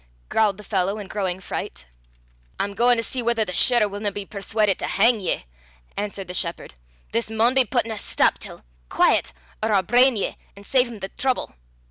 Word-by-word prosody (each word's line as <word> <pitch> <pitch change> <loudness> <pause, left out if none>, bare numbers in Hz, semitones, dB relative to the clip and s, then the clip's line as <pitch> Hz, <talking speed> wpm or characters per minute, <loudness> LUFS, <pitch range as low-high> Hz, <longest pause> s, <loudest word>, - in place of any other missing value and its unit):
growled 210 -3 +2
the 210 - -11
fellow 195 0 -1
in 205 -2 -7
growing 190 -2 -3
fright. 65 - -6 0.7
"I'm 200 - -1
gauin' 240 +3 +3
to 230 - -1
see 255 +2 -3
whether 230 -2 +1
the 180 - -6
shirra' 240 +2 +4
winna 205 +1 -3
be 200 0 -6
perswaudit 200 0 0
to - - -3
hang 225 +3 +3
ye," 185 - -2 0.5
answered 200 -2 -4
the 180 - -6
shepherd. 170 - -3 0.4
"This 115 - -1
maun 225 +3 +3
be 265 -1 +4
putten 235 -3 0
a 215 - -4
stap - - +1
till. - - -9 0.3
Quaiet! - - +2 0.3
or 220 0 0
I'll 195 -2 +3
brain 245 +2 +4
ye, 200 - -2 0.2
an' 200 - -13
save 255 +4 +3
him 235 -2 -9
the 190 - -4
trouble. 260 - -2
210 Hz, 195 wpm, -23 LUFS, 195-235 Hz, 0.7 s, shirra